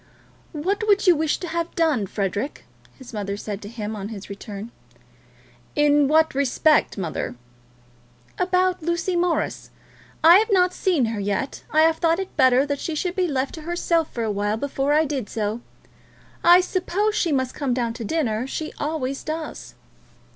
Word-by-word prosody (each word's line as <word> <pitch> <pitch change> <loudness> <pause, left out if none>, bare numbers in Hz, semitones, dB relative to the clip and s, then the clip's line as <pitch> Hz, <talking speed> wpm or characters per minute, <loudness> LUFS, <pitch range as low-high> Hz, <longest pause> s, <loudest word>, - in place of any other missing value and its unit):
"What 390 +8 -2
would 405 0 +3
you 360 -2 +6
wish 310 0 0
to 355 - -6
have 335 +1 -3
done, 300 - +1
Frederic?" 200 +7 -3 0.3
his 260 -3 -12
mother 200 -1 -3
said 205 -1 -5
to 205 - -8
him 220 -2 -5
on 200 -1 -5
his 200 -3 -8
return. 205 +2 -8 1.0
"In 295 -1 +4
what 315 +2 +3
respect, 280 +2 +2
mother?" 170 -8 -3 1.0
"About 365 0 +1
Lucy 340 +2 -1
Morris? 345 -1 -1 0.5
I 340 +4 +9
have 440 +2 0
not 365 -2 +4
seen 340 -10 +1
her 225 -2 -3
yet. 205 +7 -2
I 310 - +3
have 320 0 +4
thought 330 -1 +2
it 385 0 -5
better 260 -1 +4
that 285 -1 -2
she 325 - -3
should 355 +3 -2
be 370 -2 +1
left 270 -3 -1
to 320 - -8
herself 335 0 0
for 235 - -3
a 220 - -1
while 205 +1 -1
before 275 +2 -1
I 310 +2 +4
did 275 -7 -3
so. 215 +1 -2 0.8
I 350 +1 +8
suppose 380 +3 -1
she 350 -6 0
must 260 -2 0
come 270 -4 -1
down 235 -2 -1
to 230 0 -7
dinner. 245 -3 -1
She 310 +3 -5
always 285 -3 -3
does." 315 0 -6
295 Hz, 175 wpm, -23 LUFS, 230-340 Hz, 1.0 s, I